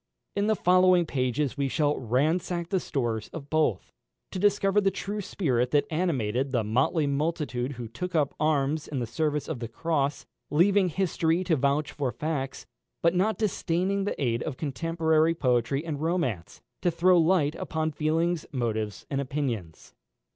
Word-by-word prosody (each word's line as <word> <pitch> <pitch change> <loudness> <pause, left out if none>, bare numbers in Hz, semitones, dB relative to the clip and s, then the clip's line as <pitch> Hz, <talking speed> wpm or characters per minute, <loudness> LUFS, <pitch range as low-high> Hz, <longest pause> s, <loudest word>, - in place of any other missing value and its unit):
In 200 +1 +1
the 220 - +3
following 180 -1 +4
pages 135 0 -1
we 140 - +1
shall 145 +2 +1
ransack 165 - 0
the 190 - +1
stores 120 -9 -2
of 145 -4 -8
both, 155 - +1 0.4
to 185 - -4
discover 205 0 +3
the 195 - +3
true 200 +2 -4
spirit 125 -11 0
that 145 +1 +2
animated 135 -7 0
the 120 -4 0
motley 130 - +1
multitude 140 -3 -1
who 120 -2 -6
took 175 +11 -5
up 145 -3 +2
arms 150 0 +1
in 145 - -4
the 120 - -1
service 150 +5 -1
of 160 -6 -4
the 115 - -4
cross, 145 +3 -1 0.2
leaving 185 +4 +4
history 170 0 0
to 170 -3 +2
vouch 140 +2 +1
for 135 -4 -2
facts, 145 -3 -4 0.4
but 170 0 +4
not 195 +5 +1
disdaining 195 -1 0
the - - -3
aid 120 -4 0
of 145 -5 -4
contemporary 160 +1 +1
poetry 130 +1 +1
and 150 -3 -4
romance, 160 - -2 0.2
to 175 - +2
throw 175 +2 +4
light 160 -3 +3
upon 160 -1 -2
feelings, 160 +3 0
motives, 110 -6 -2
and 140 0 0
opinions. 125 - -4
155 Hz, 160 wpm, -27 LUFS, 130-170 Hz, 0.4 s, following